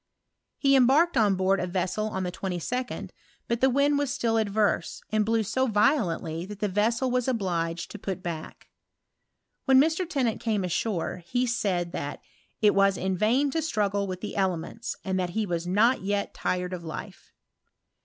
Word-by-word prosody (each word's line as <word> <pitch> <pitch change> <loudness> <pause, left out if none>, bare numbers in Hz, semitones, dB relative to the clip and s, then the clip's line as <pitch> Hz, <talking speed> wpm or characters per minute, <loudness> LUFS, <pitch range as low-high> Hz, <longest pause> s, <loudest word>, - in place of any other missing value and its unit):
He 275 -1 +4
embarked 275 +7 +4
on 210 -5 +4
board 190 +1 +2
a 180 - -2
vessel 185 +4 -1
on 190 -3 -3
the 180 - -2
22d, 195 +8 -4 0.4
but 235 0 -1
the 265 - +5
wind 285 +2 +3
was 285 -3 -1
still 235 -5 0
adverse^ 215 -1 0
and 215 0 +2
blew 225 +1 +1
so 260 +5 0
violently 205 - +1
that 205 0 -8
the 210 - 0
vessel 230 +6 +1
was 250 0 0
obliged 175 -8 -1
to 210 - -8
put 190 -1 -4
back. 165 -2 -6 1.0
When 265 -1 +6
Mr. 325 +4 +2
Tennant 255 -9 0
came 215 -4 0
ashore, 180 0 -1
he 245 +6 +1
said 195 -8 -1
that 145 -2 -4 0.2
" - - -42
it 210 - +6
was 195 -1 +3
in 190 +1 -1
vain 250 +9 +2
to 325 - 0
struggle 205 -9 0
with 185 -1 -5
the 210 - -5
elements, 190 +3 -2
and 190 -1 0
that 180 -1 -1
he 220 - +1
was 175 -2 -3
not 215 +7 +3
yet 200 +1 -1
tired 180 0 -2
of 175 -2 -5
life.'' 160 -2 -8
210 Hz, 180 wpm, -27 LUFS, 185-245 Hz, 1.0 s, When